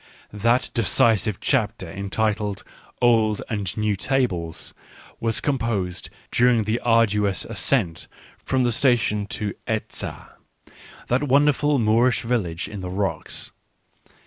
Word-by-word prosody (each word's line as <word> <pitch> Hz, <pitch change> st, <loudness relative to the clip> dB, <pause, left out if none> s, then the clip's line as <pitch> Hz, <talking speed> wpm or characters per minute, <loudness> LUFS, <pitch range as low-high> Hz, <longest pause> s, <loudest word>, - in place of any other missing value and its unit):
That 115 Hz, +4 st, +1 dB
decisive 110 Hz, -3 st, +3 dB
chapter, 110 Hz, -7 st, 0 dB
entitled 100 Hz, +2 st, -2 dB, 0.2 s
" -, -, -29 dB
Old 110 Hz, -3 st, +3 dB
and 100 Hz, -3 st, -3 dB
New 105 Hz, -1 st, +1 dB
Tables," 95 Hz, -, -1 dB, 0.5 s
was 115 Hz, -1 st, 0 dB
composed 110 Hz, -10 st, -2 dB, 0.2 s
during 120 Hz, -2 st, +3 dB
the 110 Hz, +3 st, -1 dB
arduous 105 Hz, -4 st, +2 dB
ascent 105 Hz, -, -1 dB, 0.3 s
from 130 Hz, -1 st, 0 dB
the 120 Hz, -, +2 dB
station 110 Hz, -4 st, +2 dB
to 105 Hz, 0 st, -3 dB
Eza 110 Hz, -2 st, -5 dB, 0.3 s
— -, -, -20 dB
that 130 Hz, +4 st, +1 dB
wonderful 145 Hz, +1 st, +3 dB
Moorish 115 Hz, +2 st, +2 dB
village 100 Hz, -9 st, -2 dB
in 105 Hz, -1 st, -7 dB
the 90 Hz, -1 st, -5 dB
rocks. 95 Hz, +1 st, -2 dB
110 Hz, 120 wpm, -23 LUFS, 100-120 Hz, 0.5 s, decisive